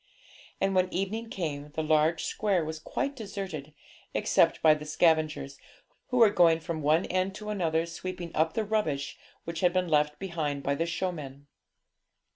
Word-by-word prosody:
And 195 - +1
when 185 -1 +2
evening 215 +5 -2
came, 150 -7 -4
the 160 - -1
large 155 +1 +2
square 195 -6 0
was 160 0 -5
quite 280 - -3
deserted, 195 - -6 0.4
except - - +3
by 155 -1 +8
the 150 0 -5
scavengers, 155 -2 +1 0.5
who 255 - -1
were 225 -4 +7
going 170 -4 +5
from 165 -1 -4
one 155 +4 +3
end 185 +1 -1
to 210 0 -5
another 165 -5 0
sweeping 175 0 -6
up 160 +1 +2
the 220 - -1
rubbish 160 -10 -1 0.2
which 170 -1 -5
had 180 0 +3
been 185 -2 +1
left 150 -1 +2
behind 155 -7 -3
by 140 - +1
the 165 +4 -1
showmen. 150 -6 -4
165 Hz, 165 wpm, -29 LUFS, 155-190 Hz, 0.5 s, by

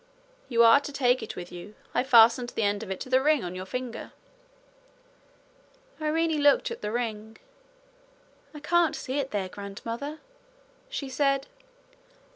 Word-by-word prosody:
'You 235 -2 +4
are 230 +4 +7
to 290 - -7
take 255 -2 +2
it 220 - -7
with 175 0 -8
you. 180 +4 -10 0.2
I've 260 - 0
fastened 235 0 +6
the 225 - 0
end 205 0 0
of 220 - -7
it 190 - -4
to - - -6
the 260 0 +4
ring 300 -2 +2
on 175 0 -5
your 185 +1 -7
finger.' 250 +2 -6 1.9
Irene 315 0 0
looked 285 +9 +4
at 465 - -7
the 210 - -3
ring. 220 -2 -4 1.2
'I 300 - -9
can't 345 0 +2
see 265 +3 -3
it 270 -1 -2
there, 200 -5 -2
grandmother,' 230 +9 -6 0.7
she 310 - -4
said. 275 +1 +1
250 Hz, 155 wpm, -27 LUFS, 215-285 Hz, 1.9 s, are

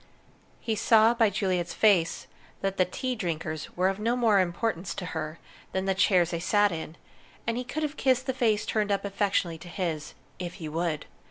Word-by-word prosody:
He 225 - -2
saw 225 +1 +5
by 230 -3 +3
Juliet's 185 -4 -1
face 190 -7 +3 0.4
that 195 0 -1
the 185 - +4
tea 255 +8 -3
drinkers 165 -7 -4
were 185 +1 +3
of 195 +1 -1
no 230 +3 +1
more 225 -5 +4
importance 180 0 -1
to 180 - -5
her 155 0 -4 0.4
than 190 0 -1
the 195 - +2
chairs 185 -2 +3
they 170 - -2
sat 205 +3 +3
in, 160 -1 -6 0.5
and 230 - 0
he 250 - -2
could 310 +5 -4
have 300 0 -3
kissed 260 -1 +2
the 260 - -1
face 220 -4 +1
turned 210 -2 0
up 200 0 0
affectionately 195 -4 0
to 180 - -11
his 170 -4 -3 0.2
if 175 -1 -5
he 160 - -6
would. 160 0 -2
195 Hz, 195 wpm, -28 LUFS, 170-220 Hz, 0.5 s, saw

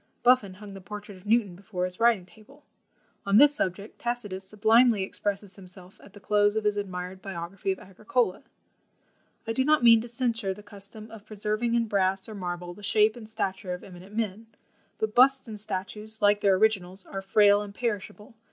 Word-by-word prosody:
Buffon 240 -7 +4
hung 205 0 -11
the 195 - -9
portrait 205 +1 -8
of 185 +3 -16
Newton 215 -5 +2
before 185 -1 -4
his 180 0 -5
writing 230 -5 +3
table. 220 +10 -19 0.6
On 200 +1 +3
this 290 +3 +7
subject, 200 -5 -3
Tacitus 215 -6 -3
sublimely 220 +2 +4
expresses 200 0 -4
himself 185 0 -9
at 200 - -16
the 205 - -12
close 205 +1 +2
of 220 - 0
his 210 -1 +1
admired 185 -2 -5
biography 195 0 -4
of 190 - -2
Agricola: 195 +2 -1 1.0
"I 225 - -2
do 260 - +1
not 300 -1 +3
mean 230 -1 +7
to 235 - -7
censure 230 -5 -1
the 210 - -13
custom 205 +1 -9
of 215 -2 -12
preserving 215 +3 -1
in 235 -1 +2
brass 195 -2 0
or 220 - -8
marble 175 -2 -5
the 205 - -14
shape 215 +1 +3
and 220 -3 -11
stature 190 -4 -3
of 180 - -12
eminent 185 +2 -12
men; 220 0 -3 0.5
but 215 -1 -2
busts 265 +2 +5
and 215 -2 -7
statues, 210 +2 -5
like 205 0 +3
their 195 -2 +4
originals, 190 -2 0
are 195 - -6
frail 205 +1 +5
and 200 -1 -8
perishable. 210 -2 -4
205 Hz, 190 wpm, -27 LUFS, 190-220 Hz, 1.0 s, this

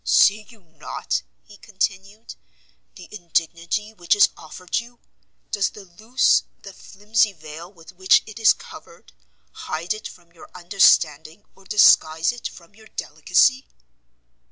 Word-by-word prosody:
"See 210 +1 +3
you 225 -4 -18
not," 160 - -5 0.2
he 205 - -17
continued, 200 0 -5 0.6
"the 180 - -13
indignity 170 +2 -3
which 175 -3 0
is 205 - +5
offered 180 +5 -5
you? 240 +1 -13 0.5
Does 200 -1 0
the 205 - -14
loose, 220 +8 +1 0.2
the 195 - -11
flimsy 210 +2 -1
veil 160 +1 -11
with 165 -4 -16
which 185 +1 +3
it 220 +1 -11
is 225 - +6
covered, - - -10 0.4
hide 165 +5 -4
it 215 - -8
from 170 - -17
your 170 - -16
understanding, 170 -2 +2
or 195 - -21
disguise 165 -5 +4
it 240 0 -6
from 170 +1 -16
your 220 +1 -18
delicacy?" 260 +3 +1
195 Hz, 135 wpm, -22 LUFS, 170-215 Hz, 0.6 s, is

